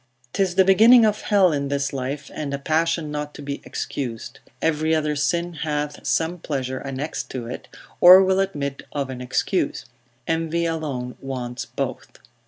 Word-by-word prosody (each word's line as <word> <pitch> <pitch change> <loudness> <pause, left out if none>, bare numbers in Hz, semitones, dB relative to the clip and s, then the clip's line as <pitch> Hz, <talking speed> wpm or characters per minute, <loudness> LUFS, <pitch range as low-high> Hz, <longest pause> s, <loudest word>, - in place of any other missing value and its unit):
'Tis 190 -2 0
the 190 0 +5
beginning 225 +5 +7
of 210 -1 +1
hell 195 -4 +4
in 140 -2 -1
this 140 0 -1
life, 135 +2 -4
and 140 -2 -3
a - - -3
passion 160 +2 0
not 150 0 -5
to - - -9
be 140 0 -5
excused. 120 -3 -5 0.2
Every 160 0 +1
other 150 -1 0
sin 170 +4 0
hath 150 -2 -3
some 165 +2 0
pleasure 130 -4 -3
annexed 135 +3 -5
to 125 -3 -5
it, 120 - -7 0.3
or 185 +2 +10
will 190 0 +2
admit 145 -8 -2
of 140 -2 -2
an 125 -1 -7
excuse; 140 +6 -1 0.4
envy 165 +1 0
alone 145 -7 -3
wants 125 -2 -5
both. 130 -3 -5
150 Hz, 165 wpm, -23 LUFS, 135-170 Hz, 0.4 s, or